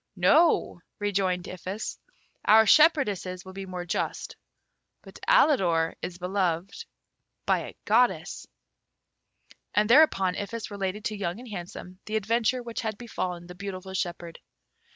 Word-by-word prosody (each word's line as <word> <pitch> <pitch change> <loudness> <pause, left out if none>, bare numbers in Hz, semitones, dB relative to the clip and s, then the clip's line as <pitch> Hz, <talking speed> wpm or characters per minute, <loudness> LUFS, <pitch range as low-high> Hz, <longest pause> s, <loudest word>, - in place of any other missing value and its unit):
"No," 205 - +3 0.2
rejoined 190 -3 -1
Iphis; 185 +4 -6 0.4
"our 220 +1 +6
shepherdesses 210 - +3
will 190 - -10
be 195 0 -7
more 180 -1 -5
just; 175 - -3 0.7
but - - -13
Alidor 190 - +3
is 175 -1 -5
beloved 180 - -2 0.6
by - - +2
a - - -8
goddess." 190 -8 +1 1.3
And 210 0 +3
thereupon 230 -8 +5
Iphis 210 +3 -5
related 200 +1 -4
to 215 - -2
Young 195 -2 -3
and 250 -1 -11
Handsome 180 -1 -8
the 215 - -3
adventure 230 +4 0
which 235 -1 -5
had 220 -2 -3
befallen 180 -7 -5
the 180 - -10
beautiful 190 0 -7
shepherd. 175 -2 -4
195 Hz, 130 wpm, -27 LUFS, 180-220 Hz, 1.3 s, our